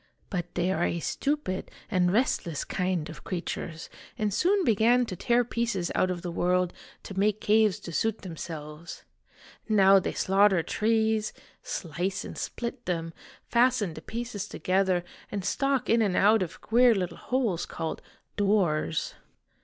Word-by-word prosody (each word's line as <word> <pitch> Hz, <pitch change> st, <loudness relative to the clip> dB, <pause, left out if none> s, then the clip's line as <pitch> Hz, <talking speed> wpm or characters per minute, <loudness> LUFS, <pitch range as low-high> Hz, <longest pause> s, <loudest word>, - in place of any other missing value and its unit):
But 175 Hz, -3 st, -4 dB
they 175 Hz, +1 st, +1 dB
are 175 Hz, -2 st, 0 dB
a 170 Hz, -, 0 dB
stupid 275 Hz, -, -2 dB, 0.2 s
and 180 Hz, -3 st, +3 dB
restless 185 Hz, -, 0 dB
kind 180 Hz, -4 st, -1 dB
of 160 Hz, -, -10 dB
creatures, 170 Hz, -2 st, -4 dB, 0.3 s
and 210 Hz, -2 st, 0 dB
soon 375 Hz, -, +2 dB
began 235 Hz, +2 st, +4 dB
to 190 Hz, -, -5 dB
tear 240 Hz, +7 st, +2 dB
pieces 230 Hz, -7 st, -1 dB
out 185 Hz, -, +2 dB
of 180 Hz, -1 st, -3 dB
the 175 Hz, -, -3 dB
world 180 Hz, +1 st, +1 dB, 0.3 s
to 195 Hz, -1 st, -5 dB
make 210 Hz, +1 st, +2 dB
caves 215 Hz, -2 st, +3 dB
to 170 Hz, -, -7 dB
suit 225 Hz, +6 st, -1 dB
themselves. 160 Hz, -2 st, -7 dB, 0.7 s
Now 195 Hz, -2 st, +6 dB
they 185 Hz, -, -3 dB
slaughter 195 Hz, -2 st, +3 dB
trees, 220 Hz, +1 st, +1 dB, 0.3 s
slice 180 Hz, +3 st, -3 dB
and -, -, -7 dB
split 240 Hz, +1 st, -5 dB
them, 165 Hz, -2 st, -2 dB, 0.3 s
fasten 235 Hz, -7 st, +2 dB
the 155 Hz, -, -9 dB
pieces 230 Hz, 0 st, -5 dB
together, 185 Hz, -1 st, +1 dB, 0.3 s
and 200 Hz, -3 st, -3 dB
stalk 275 Hz, +3 st, 0 dB
in 230 Hz, 0 st, +4 dB
and 200 Hz, -4 st, +1 dB
out 210 Hz, +2 st, +5 dB
of 180 Hz, -, -4 dB
queer 240 Hz, 0 st, +5 dB
little 180 Hz, -3 st, -2 dB
holes 230 Hz, -10 st, -1 dB
called 165 Hz, -1 st, -4 dB, 0.2 s
' -, -, -48 dB
doors.' 185 Hz, -7 st, +1 dB
195 Hz, 155 wpm, -28 LUFS, 175-225 Hz, 0.7 s, Now